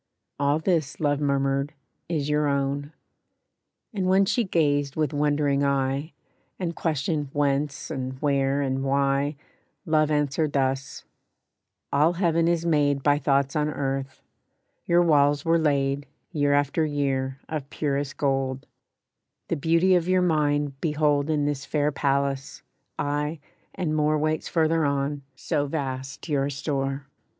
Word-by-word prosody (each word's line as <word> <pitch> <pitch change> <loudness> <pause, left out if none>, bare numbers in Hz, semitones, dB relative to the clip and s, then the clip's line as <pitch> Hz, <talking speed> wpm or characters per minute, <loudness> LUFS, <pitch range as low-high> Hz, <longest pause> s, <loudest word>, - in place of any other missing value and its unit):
"All 145 +1 +2
this," 160 -3 0
Love 145 -2 +1
murmured, 140 0 0 0.4
"is 150 -4 -1
your 150 0 +1
own." 140 +1 -1 1.0
And 190 -3 -1
when 190 +1 +4
she 240 +5 +1
gazed 145 -7 +1
with 155 -3 0
wondering 145 -1 +1
eye, 140 +2 0 0.4
And 170 -3 -3
questioned 150 -2 -1
whence 145 +1 -1
and 130 -2 -4
where 140 -1 +1
and 135 0 -1
why, 140 +1 +1 0.5
Love 155 -1 +2
answered 150 0 0
thus: 135 0 -1 0.9
"All 150 +4 +4
Heaven 170 -2 +2
is 170 -1 +1
made 145 -4 +2
By 145 0 +3
thoughts 140 -1 +1
on 150 0 +1
earth; 135 -2 -3 0.6
your 175 +1 +4
walls 145 -2 +3
were 165 0 +3
laid, 140 -2 0 0.2
Year 145 -4 +1
after 145 +3 +2
year, 135 -3 -1
of 150 -3 -5
purest 145 -2 -2
gold; 135 -1 -1 0.8
The - - +1
beauty 165 +5 +3
of 175 -1 +2
your 185 0 +3
mind 145 -4 +1
behold 150 -2 +1
In 150 -2 +1
this 145 -2 -2
fair 150 -1 0
palace; 140 -1 -1 0.3
aye, 145 +2 -2 0.4
and 155 -4 -1
more 155 0 +2
Waits 155 +1 -1
farther 165 -1 +2
on, 140 0 -1
so 145 +2 -1
vast 135 -2 -4
your 140 -3 0
store. 135 -1 -2
145 Hz, 135 wpm, -25 LUFS, 140-155 Hz, 1.0 s, when